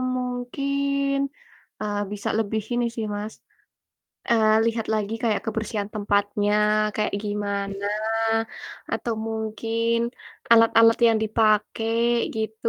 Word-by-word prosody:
mungkin 275 Hz, +3 st, -1 dB, 0.7 s
eee, 205 Hz, -1 st, -2 dB
bisa 205 Hz, -1 st, -3 dB
lebih 220 Hz, 0 st, -1 dB
ini 240 Hz, 0 st, +1 dB
sih, 225 Hz, -, -2 dB
Mas, 210 Hz, +1 st, -5 dB, 1.0 s
eee, 220 Hz, -2 st, +4 dB
lihat 230 Hz, -1 st, -1 dB
lagi 215 Hz, 0 st, -1 dB
kayak 220 Hz, -3 st, +1 dB
kebersihan 215 Hz, -2 st, -3 dB
tempatnya 205 Hz, 0 st, +1 dB, 0.4 s
kayak 210 Hz, -1 st, 0 dB
gimana 200 Hz, -1 st, -3 dB, 1.1 s
atau 235 Hz, -, -1 dB
mungkin 225 Hz, +1 st, -1 dB, 0.6 s
alat-alat 230 Hz, 0 st, +6 dB
yang 225 Hz, -1 st, +3 dB
dipake 215 Hz, 0 st, +1 dB, 0.5 s
gitu 220 Hz, +1 st, -2 dB
220 Hz, 100 wpm, -24 LUFS, 210-230 Hz, 1.1 s, alat-alat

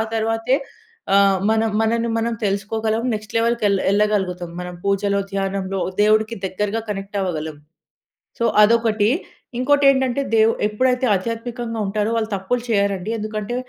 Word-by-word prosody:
తర్వాతే 225 Hz, +3 st, +1 dB, 0.6 s
ఆహ్, 195 Hz, -1 st, +4 dB
మనం 220 Hz, 0 st, +1 dB
మనన్ని 230 Hz, +1 st, 0 dB
మనం 230 Hz, +1 st, -1 dB
తెలుసుకోగలం. 215 Hz, +3 st, -1 dB
నెక్స్ట్ 215 Hz, +1 st, -7 dB
లెవెల్‌కి 235 Hz, 0 st, +1 dB
ఎళ్ళ 195 Hz, -1 st, +1 dB
ఎళ్ళగలుగుతం 195 Hz, -4 st, 0 dB
మనం 180 Hz, 0 st, -7 dB
పూజలో, 200 Hz, 0 st, +1 dB
ధ్యానంలో 195 Hz, -1 st, -2 dB, 0.2 s
దేవుడికి 215 Hz, +2 st, +2 dB
దగ్గరగా 210 Hz, +4 st, -2 dB
కనెక్ట్ 195 Hz, 0 st, -5 dB
అవ్వగలం. 160 Hz, -4 st, -3 dB, 0.8 s
సో, -, -, +2 dB, 0.2 s
అదొకటి. 220 Hz, -1 st, +3 dB, 0.5 s
ఇంకోటి 285 Hz, +3 st, +3 dB
ఏంటంటే 265 Hz, 0 st, +1 dB
దేవు 220 Hz, 0 st, +5 dB
ఎప్పుడైతే 250 Hz, +4 st, +1 dB
ఆధ్యాత్మికంగా 230 Hz, +3 st, -4 dB
ఉంటారో, 210 Hz, +2 st, -1 dB
వాళ్ళు 220 Hz, -1 st, -1 dB
తప్పులు 215 Hz, +6 st, -2 dB
చేయరండి. 200 Hz, -2 st, 0 dB
ఎందుకంటే 215 Hz, +1 st, -4 dB
215 Hz, 125 wpm, -21 LUFS, 200-230 Hz, 0.8 s, దేవు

